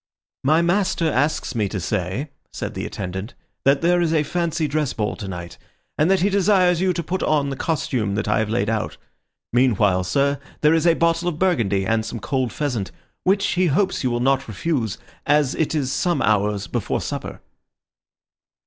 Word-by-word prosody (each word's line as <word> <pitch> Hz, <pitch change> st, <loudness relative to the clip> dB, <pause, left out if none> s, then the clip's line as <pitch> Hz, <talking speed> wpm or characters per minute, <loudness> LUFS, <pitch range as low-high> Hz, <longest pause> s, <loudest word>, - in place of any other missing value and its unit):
"My 155 Hz, +5 st, +4 dB
master 180 Hz, -1 st, +1 dB
asks 145 Hz, 0 st, 0 dB
me 105 Hz, -5 st, 0 dB
to 95 Hz, -, -3 dB
say," 100 Hz, -, -2 dB, 0.2 s
said -, -, -5 dB
the -, -, -4 dB
attendant, 95 Hz, +3 st, -5 dB, 0.3 s
"that 140 Hz, +1 st, +4 dB
there 175 Hz, +1 st, +3 dB
is 165 Hz, -2 st, +1 dB
a 150 Hz, -, +3 dB
fancy 165 Hz, 0 st, -1 dB
dress 150 Hz, -1 st, -1 dB
ball 105 Hz, -2 st, -2 dB
tonight, 90 Hz, -5 st, -7 dB, 0.4 s
and 155 Hz, +4 st, +2 dB
that 195 Hz, -1 st, +3 dB
he 200 Hz, -, +3 dB
desires 185 Hz, -3 st, +3 dB
you 190 Hz, 0 st, +3 dB
to 170 Hz, -, -3 dB
put 185 Hz, +4 st, -3 dB
on 145 Hz, -2 st, +1 dB
the -, -, -3 dB
costume 125 Hz, -10 st, -1 dB
that 105 Hz, 0 st, -2 dB
I 105 Hz, -, +2 dB
have 110 Hz, -1 st, -1 dB
laid 110 Hz, -2 st, 0 dB
out. 110 Hz, -1 st, -2 dB, 0.6 s
Meanwhile, 105 Hz, -7 st, +3 dB
sir, 140 Hz, +5 st, +1 dB, 0.2 s
there 150 Hz, +1 st, +5 dB
is 165 Hz, +1 st, +2 dB
a 165 Hz, -, +5 dB
bottle 170 Hz, +1 st, +1 dB
of 160 Hz, -, -5 dB
Burgundy 115 Hz, -, +1 dB
and 110 Hz, +2 st, +1 dB
some 115 Hz, +1 st, -5 dB
cold 130 Hz, 0 st, -1 dB
pheasant, 120 Hz, -8 st, -2 dB, 0.4 s
which 195 Hz, +1 st, +3 dB
he 180 Hz, 0 st, +2 dB
hopes 185 Hz, +5 st, +1 dB
you 130 Hz, -, +2 dB
will 120 Hz, 0 st, -1 dB
not 135 Hz, +1 st, +2 dB
refuse, 115 Hz, -, -2 dB, 0.3 s
as 145 Hz, -2 st, +3 dB
it 160 Hz, 0 st, -1 dB
is 135 Hz, -4 st, 0 dB
some 175 Hz, +1 st, 0 dB
hours 105 Hz, -1 st, +1 dB
before -, -, -2 dB
supper." -, -, -5 dB
140 Hz, 185 wpm, -22 LUFS, 110-170 Hz, 0.6 s, there